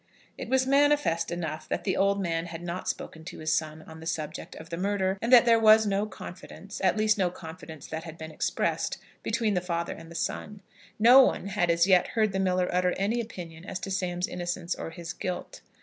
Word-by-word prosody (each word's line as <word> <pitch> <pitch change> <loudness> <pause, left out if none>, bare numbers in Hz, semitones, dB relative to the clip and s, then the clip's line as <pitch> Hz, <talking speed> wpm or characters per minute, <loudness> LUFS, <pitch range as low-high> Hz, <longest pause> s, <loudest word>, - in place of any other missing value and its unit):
It - - -7
was 265 0 +3
manifest 280 - +3
enough 160 -3 -4
that - - -2
the 190 - 0
old 200 +1 +2
man 170 -2 -1
had 165 0 -7
not 175 +1 -4
spoken 160 - -5
to - - -8
his 155 0 -1
son 155 -1 -2
on 160 0 -12
the 160 - -8
subject 155 -2 -4
of 160 +1 -11
the - - -2
murder, 190 0 0
and 230 - -1
that 245 -1 +9
there 230 -1 +5
was 220 0 +7
no 200 +1 0
confidence, 195 0 -9
at 190 +2 +3
least, 215 0 +2
no 185 -2 +3
confidence 160 -3 -10
that 160 0 -5
had 160 -1 -9
been 160 -1 -8
expressed, - - -1 0.2
between 225 -1 0
the 180 - +1
father 170 -1 -2
and 165 0 -12
the 170 - -11
son. 205 +3 -4 0.3
No 245 +5 +8
one 200 -6 +1
had 175 -2 0
as 170 0 +4
yet 185 -2 +4
heard 215 -3 +1
the 190 - -2
miller 185 -1 +1
utter 180 0 +2
any 215 +5 0
opinion 170 -7 -9
as 190 - -5
to 195 - -5
Sam's 180 -1 -1
innocence 175 0 -3
or - - -6
his 170 0 -7
guilt. 180 -1 -5
180 Hz, 220 wpm, -28 LUFS, 165-205 Hz, 0.3 s, that